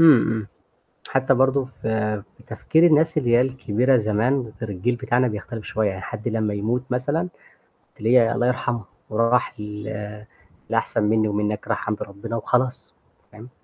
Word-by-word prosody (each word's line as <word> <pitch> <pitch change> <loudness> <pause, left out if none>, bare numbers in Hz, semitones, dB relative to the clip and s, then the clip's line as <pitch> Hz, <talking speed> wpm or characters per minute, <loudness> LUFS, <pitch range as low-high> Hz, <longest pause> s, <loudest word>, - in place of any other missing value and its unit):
إمم، 155 -8 +8
إمم. 110 -2 -3 0.6
حتى 130 0 +2
برضه 130 +1 +3
ف 120 -3 -11
في 110 -2 -2
تفكير 165 +2 +3
الناس 160 0 +4
اللي 120 -5 0
هي 120 +1 +6
الكبيرة 130 0 +2
زمان، 115 +2 0
غير 110 -3 -4
الجيل 115 +6 -1
بتاعنا 125 0 +1
بيختلف 110 +1 -6
شوية، 110 -1 0
يعني 95 -1 -6
حد 110 +2 -5
لمّا 110 -2 -1
يموت 115 +5 -1
مثلًا 145 +8 0 0.7
تلاقي 115 +1 +4
الله 120 +1 +1
يرحمها 120 -3 -1 0.3
راح 115 0 +1
ل - - -5 1.1
للأحسن - - 0
منّي 110 +1 +2
ومنّك 105 0 -2
راح - - -1
عند 105 - -2
ربّنا 100 +4 -7
وخلاص، 125 +2 -1 0.4
فاهم؟ 110 +4 -12
115 Hz, 155 wpm, -23 LUFS, 105-130 Hz, 1.1 s, إمم